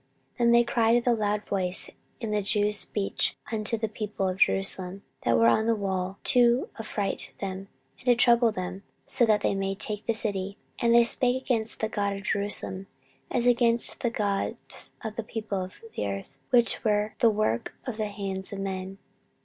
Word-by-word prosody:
14:032:018 - - -39
Then 235 -1 +4
they 235 0 +6
cried 235 -1 +2
with 240 +1 0
a 240 - +5
loud 210 -1 -1
voice 185 -2 -1 0.3
in 225 -4 -4
the 210 0 +1
Jews' 210 +1 +2
speech 200 -2 -1
unto 220 +1 -1
the 220 0 -2
people 210 -2 -3
of 185 0 -2
Jerusalem 195 0 +2 0.2
that 115 -1 +2
were 115 - +4
on 220 - +3
the 230 - +3
wall, 190 -2 -3
to 245 +1 +4
affright 205 -3 -3
them, 195 0 -5 0.3
and - - -18
to 245 -1 +5
trouble 235 -1 +5
them; 185 -1 -5 0.4
that 220 -4 +4
they - - +2
might 195 0 -2
take 210 0 0
the 230 - +2
city. 200 -3 +1 0.2
14:032:019 - - -2
And 235 - +5
they 235 - +7
spake 245 +2 +3
against 230 -4 -1
the 220 - 0
God 200 -2 -1
of 195 - -8
Jerusalem, 195 -1 -1 0.4
as 240 -1 +1
against 235 -1 +3
the 240 - 0
gods 205 -3 -3
of 220 -1 -6
the 230 - -2
people 215 -4 -4
of 185 - -13 0.2
the 105 - -2
earth, 100 +7 -6
which 240 -2 +3
were 210 -1 +1
the 230 - +5
work 210 - -1
of 250 -5 -5
the 215 -1 -1
hands 195 -2 -5
of 200 - -5
man. 190 0 -5
210 Hz, 195 wpm, -27 LUFS, 195-230 Hz, 0.4 s, they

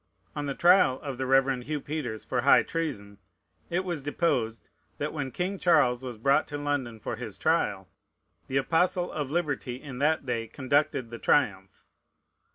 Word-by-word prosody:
On 145 -1 -3
the 140 - -3
trial 175 -7 +5
of 135 -4 -5
the 130 - -1
Reverend 135 -1 +2
Hugh 150 0 -2
Peters 140 -7 -5
for 125 - -1
high 140 - +6
treason, 105 -12 -4 0.5
it 180 +2 -1
was 170 -5 -3
deposed, 125 -7 -1 0.3
that, - - -3
when 145 -4 -3
King 185 +7 -3
Charles 140 -8 +3
was 125 -3 -6
brought 135 +5 +2
to 145 - -5
London 145 -6 -2
for 115 - -5
his 115 -4 -7
trial, 105 - 0 0.6
the 135 - -1
Apostle 175 +5 +1
of 145 -3 -3
Liberty 145 -6 -2
in 135 -4 -8
that 150 0 +1
day 115 -3 -2
conducted 140 0 0
the 115 - -7
triumph. 95 -9 +1
135 Hz, 165 wpm, -28 LUFS, 120-155 Hz, 0.6 s, high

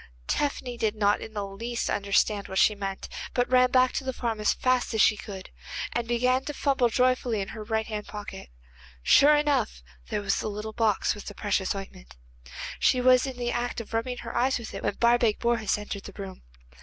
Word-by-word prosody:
Tephany 255 -4 -1
did 220 -1 0
not 205 -1 +2
in 220 - -9
the 205 -1 -2
least 230 +5 -4
understand 200 0 +1
what 190 - -5
she 210 - +5
meant, 195 -1 -5 0.3
but 245 0 +2
ran 255 0 +5
back 255 0 +4
to - - -3
the 260 - -2
farm 230 -3 -2
as 210 - +3
fast 255 -2 +1
as 220 - +3
she 210 - +5
could, 195 -2 -9 0.4
and 240 -1 -1
began 250 +2 +2
to 295 - -4
fumble 270 -4 +2
joyfully 250 -2 +1
in 195 0 -3
her 220 - -7
right 220 +1 -1
hand 210 -1 -5
pocket. 205 - -8 0.5
Sure 295 - +6
enough, 285 - 0 0.3
there 205 - -2
was 195 -1 +1
the - - -3
little 210 +1 -5
box 215 -3 +1
with 205 - -10
the 205 - -8
precious 200 -2 0
ointment. 65 - -9 0.6
She 255 - +3
was 255 +1 +5
in 260 -2 -6
the 240 -1 -1
act 240 0 -2
of 230 0 -9
rubbing 245 +2 -1
her 230 - -6
eyes 260 +2 +2
with 235 -2 -8
it - - -5
when - - -1
Barbaik 235 -2 +3
Bourhis 230 -4 +1
entered 210 -1 -6
the 200 - -11
room. 190 -1 -7
225 Hz, 210 wpm, -27 LUFS, 205-250 Hz, 0.6 s, Sure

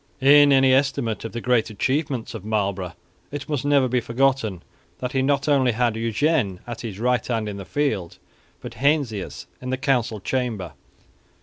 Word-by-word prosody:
In 145 +1 +7
any 135 -1 +5
estimate 135 -4 0
of 115 - -5
the 120 - -5
great 125 -2 +2
achievements 130 +3 -2
of - - -7
Marlborough 100 -4 -2 0.4
it 145 -1 -6
must 145 -5 -2
never 140 -2 +3
be 125 0 +1
forgotten 120 -6 0 0.3
that 125 -1 -4
he 135 - +1
not 140 +2 +1
only 135 -4 +3
had 120 -1 +1
Eugene 115 - 0
at 120 -1 -6
his 110 -5 -6
right 125 0 +1
hand 115 -3 -1
in 100 -1 -5
the 100 - -7
field, 105 - -2 0.4
but - - -8
Heinsius 140 -8 -1 0.2
in 125 - -5
the 130 - -1
council 125 -6 0
chamber. 115 -5 -2
125 Hz, 175 wpm, -23 LUFS, 110-135 Hz, 0.4 s, In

